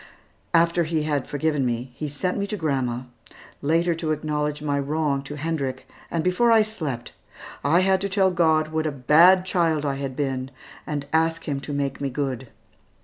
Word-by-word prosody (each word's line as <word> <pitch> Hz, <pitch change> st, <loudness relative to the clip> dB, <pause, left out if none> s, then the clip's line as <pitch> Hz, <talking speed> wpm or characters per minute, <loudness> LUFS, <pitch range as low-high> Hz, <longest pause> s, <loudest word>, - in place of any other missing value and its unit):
After 170 Hz, +1 st, +4 dB
he 160 Hz, -1 st, -1 dB
had 145 Hz, -3 st, -1 dB
forgiven 145 Hz, -1 st, 0 dB
me, 120 Hz, +1 st, -2 dB
he 150 Hz, +4 st, -5 dB
sent 180 Hz, +6 st, -2 dB
me 200 Hz, 0 st, -2 dB
to 210 Hz, -, -3 dB
grandma, 130 Hz, -7 st, -1 dB, 0.6 s
later 165 Hz, +4 st, +2 dB
to 160 Hz, -1 st, -2 dB
acknowledge 150 Hz, -1 st, -2 dB
my 145 Hz, -1 st, 0 dB
wrong 145 Hz, 0 st, 0 dB
to 140 Hz, +2 st, -8 dB
Hendrik, 140 Hz, -4 st, -3 dB, 0.2 s
and 165 Hz, -2 st, -1 dB
before 180 Hz, +7 st, +3 dB
I 225 Hz, -1 st, +6 dB
slept, 155 Hz, -, -5 dB, 0.5 s
I 165 Hz, +5 st, +4 dB
had 190 Hz, 0 st, +2 dB
to 200 Hz, -, -1 dB
tell 190 Hz, -1 st, +3 dB
God 160 Hz, -3 st, +2 dB
what 160 Hz, 0 st, -1 dB
a -, -, -1 dB
bad 165 Hz, +8 st, +5 dB
child 165 Hz, -5 st, +1 dB
I 140 Hz, -1 st, -1 dB
had 135 Hz, -2 st, -4 dB
been, 135 Hz, -2 st, -2 dB, 0.4 s
and 145 Hz, -2 st, -3 dB
ask 165 Hz, +1 st, +2 dB
Him 140 Hz, -2 st, -1 dB
to 140 Hz, -, -7 dB
make 140 Hz, -1 st, -2 dB
me 140 Hz, -, -1 dB
good. 130 Hz, -2 st, -3 dB
150 Hz, 185 wpm, -24 LUFS, 140-170 Hz, 0.6 s, I